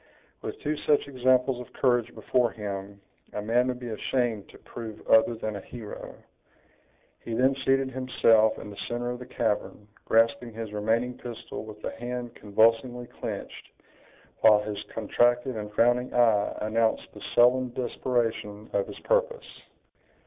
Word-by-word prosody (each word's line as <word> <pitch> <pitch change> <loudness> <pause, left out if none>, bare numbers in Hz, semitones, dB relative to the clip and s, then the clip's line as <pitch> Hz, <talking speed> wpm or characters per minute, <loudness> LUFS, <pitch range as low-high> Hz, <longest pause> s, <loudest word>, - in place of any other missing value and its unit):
"With - - -6
two 150 +1 -1
such 145 -1 +2
examples 130 -1 +2
of 125 - -11
courage 120 -2 +1
before 125 -2 +1
him, 100 -2 -6 0.3
a 105 - -3
man 120 +3 +2
would 125 -1 -2
be 120 -1 -6
ashamed 115 -2 -1
to - - -14
prove 110 -2 -8
other 110 +1 +5
than 110 -1 -4
a 100 - -5
hero." 110 0 -9 1.0
He 115 - -5
then 130 +3 +4
seated 135 0 +2
himself 115 -4 +3
in 105 - -8
the 100 - -11
center 120 +1 -2
of 125 - -5
the 125 - -9
cavern, 105 0 -2 0.2
grasping 115 +1 +2
his 110 -2 -6
remaining 115 +4 0
pistol 120 -2 -7
with 105 -1 -11
a - - -2
hand 120 0 -4
convulsively 115 +4 +2
clenched, - - -6 0.7
while 105 -1 +6
his 105 -1 -4
contracted 120 +3 +1
and 105 -1 -5
frowning 120 +3 +3
eye 110 -4 +3
announced 110 +1 +1
the - - -12
sullen 125 +1 +5
desperation 115 -4 -2
of 100 -1 +1
his - - -9
purpose. - - -1
120 Hz, 150 wpm, -27 LUFS, 110-125 Hz, 1.0 s, while